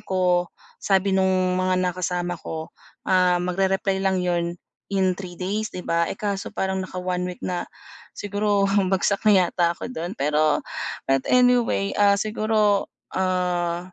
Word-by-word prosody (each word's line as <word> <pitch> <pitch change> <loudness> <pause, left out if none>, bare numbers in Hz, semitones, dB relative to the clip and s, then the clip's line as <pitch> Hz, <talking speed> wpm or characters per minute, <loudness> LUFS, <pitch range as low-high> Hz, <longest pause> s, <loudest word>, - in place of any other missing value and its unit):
ko 180 -2 +1 0.3
sabi 195 0 +2
nung 190 0 +3 0.3
mga 185 0 +1
nakasama 180 0 -2
ko, 160 0 -6 0.3
ah, 180 -1 +3
magre-reply 190 +2 0
lang 190 -1 +1
'yon 170 -1 -1 0.3
in 190 -2 +2
3 180 -2 -8
days, 205 +4 -2
di 180 - -8
ba. 170 0 +1
Eh, - - -4
kaso 200 -2 -3
parang 190 0 -2
naka-one 180 -1 -3
week - - -30
na, 180 -1 -3 0.5
siguro 205 0 0 0.2
bagsak 195 +1 +1
na - - +7 0.2
yata 170 -1 0
ako 250 - -6
dun. 175 +1 -5
Pero 150 0 +1 0.4
but 135 0 +2
anyway, 245 -5 +3
ah, 200 -1 +5
siguro, 215 -1 +1 0.2
ah, 180 -1 -1
185 Hz, 140 wpm, -23 LUFS, 175-200 Hz, 0.5 s, na